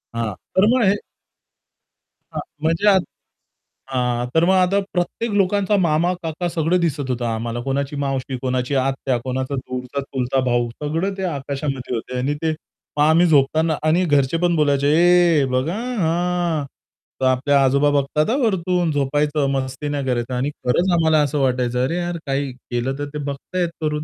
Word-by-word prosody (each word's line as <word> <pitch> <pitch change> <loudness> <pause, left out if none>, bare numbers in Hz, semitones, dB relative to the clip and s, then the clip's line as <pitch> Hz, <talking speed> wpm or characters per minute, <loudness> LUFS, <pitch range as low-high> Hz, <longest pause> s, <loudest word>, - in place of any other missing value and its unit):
हां, 115 -3 -2 0.2
तर 190 +2 +5
मग 255 - +2
हे 195 +1 +4 1.4
हां. - - -4 0.2
म्हणजे 165 +6 +1 1.0
हां, 125 -2 0
तर 165 +1 +5
मग 190 - +4
आता 185 +2 +3
प्रत्येक 200 +5 -2
लोकांचा 200 +1 +2
मामा-काका 170 +1 -1
सगळं 170 +2 +1
दिसत 145 -5 -1
होतं 125 -1 -1
आम्हाला 115 +1 -2
कोणाची 140 +2 -2
मावशी, 135 -1 -2
कोणाची 130 +1 -1
आत्या, 135 -1 0
कोणाचा 130 +2 -2
दूरचा 130 +1 -4
चुलता 135 -1 -2
भाऊ 120 -1 +1
सगळं 165 +7 -1
ते 190 - -4
आकाशामध्ये 140 -4 -3
होते 125 +3 -5
आणि 135 +3 0
ते 160 - +2 0.5
मग 145 - +4
आम्ही 160 +3 +5
झोपताना 155 +2 +3
आणि 160 +4 +3
घरचे 145 0 +2
पण 175 0 +1
बोलायचे, 145 -2 +2
"ए 170 -2 +4
बघ 130 +3 0
आ 185 - -2 0.2
हां, 170 -2 0 0.6
तर 130 - +2
आपल्या 135 +2 +3
आजोबा 140 +2 +3
बघतात 145 +4 +1
आ, 250 - +2
वरतून 180 - +1
झोपायचं, 145 +1 0
मस्ती 135 +2 -3
नाही 145 -2 -2
करायचं." 125 -1 -1
आणि 130 +3 0 0.2
खरंच 175 +9 +2
आम्हाला 160 -2 +3
असं 145 +1 -1
वाटायचं 125 -2 +1
अरे, 165 +7 -1
यार 175 -1 -2
काही 135 0 -1
केलं 125 +2 -4
तर 145 - -2
ते - - -4
बघताहेत 170 +5 -3
वरून. 150 0 -1
145 Hz, 160 wpm, -21 LUFS, 130-170 Hz, 1.4 s, तर